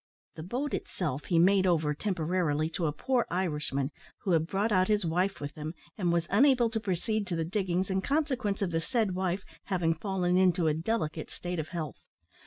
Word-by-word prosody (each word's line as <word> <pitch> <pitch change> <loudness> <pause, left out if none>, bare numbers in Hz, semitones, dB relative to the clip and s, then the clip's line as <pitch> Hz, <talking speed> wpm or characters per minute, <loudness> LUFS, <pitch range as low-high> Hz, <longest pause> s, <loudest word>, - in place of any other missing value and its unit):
The - - -8
boat 250 - -3
itself 150 -6 -3
he 170 - +1
made 190 +2 +5
over, 155 -4 +2
temporarily, 160 -3 0
to 165 -1 -1
a - - +1
poor 245 - 0
Irishman 150 -6 -1 0.3
who 190 - 0
had 160 -1 +3
brought 200 +5 0
out 185 -2 +4
his 210 -3 +2
wife 180 +4 0
with 145 0 -5
him, 155 +2 -6 0.2
and 180 -5 0
was 170 -1 +1
unable 245 +1 +5
to 225 - 0
proceed 205 +1 -1
to 175 - -2
the 165 -1 -1
diggings 185 0 -1
in 190 0 +1
consequence 260 -7 0
of 180 - -1
the 165 0 0
said 220 0 0
wife 185 +1 -1 0.2
having 175 -4 +1
fallen 180 +1 0
into 180 -2 +3
a 155 - +3
delicate 160 -2 -2
state 175 -1 -4
of 155 - -3
health. 160 -5 -5
180 Hz, 195 wpm, -30 LUFS, 165-200 Hz, 0.3 s, made